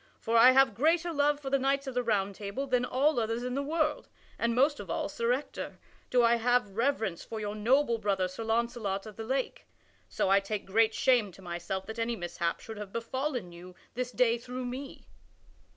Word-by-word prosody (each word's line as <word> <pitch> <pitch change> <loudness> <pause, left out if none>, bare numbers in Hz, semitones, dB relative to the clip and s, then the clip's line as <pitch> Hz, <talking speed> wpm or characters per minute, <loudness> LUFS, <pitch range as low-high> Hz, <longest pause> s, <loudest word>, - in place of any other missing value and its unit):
For 230 - -1
I 230 +2 +9
have 270 -3 +5
greater 325 - +2
love 290 0 +2
for 270 -2 -6
the 275 - +3
knights 275 +1 +1
of 265 - -5
the 250 - +1
Round 205 -4 0
Table 205 +7 -4
than 250 -2 +1
all 275 +2 +2
others 230 +1 -1
in 250 0 -3
the 275 - -1
world, 305 +1 -1 0.3
and 235 0 +1
most 285 +4 +3
of - - -8
all, - - -1
Sir 470 0 -1
Ector, - - -3 0.3
do 245 -1 +4
I 235 0 +4
have 235 -4 +1
reverence 225 -7 0
for 225 - -6
your 210 -1 -3
noble 235 +3 +2
brother 195 -3 0
Sir 185 +5 -7
Launcelot 225 -3 -1
of 215 -2 -10
the 225 - -6
Lake. 260 +3 -3 0.4
So - - 0
I 195 +1 +5
take 200 +1 -4
great 220 +3 +2
shame 245 -6 +3
to 190 - -15
myself 175 +2 -4
that 220 +1 -7
any 230 +1 0
mishap 170 -3 -3
should 220 -1 -8
have 205 -2 -7
befallen 245 -2 -3
you 180 +1 -12 0.2
this 250 0 -3
day 240 -2 +2
through 250 +1 -6
me." 260 +3 -7
235 Hz, 210 wpm, -30 LUFS, 210-265 Hz, 0.4 s, I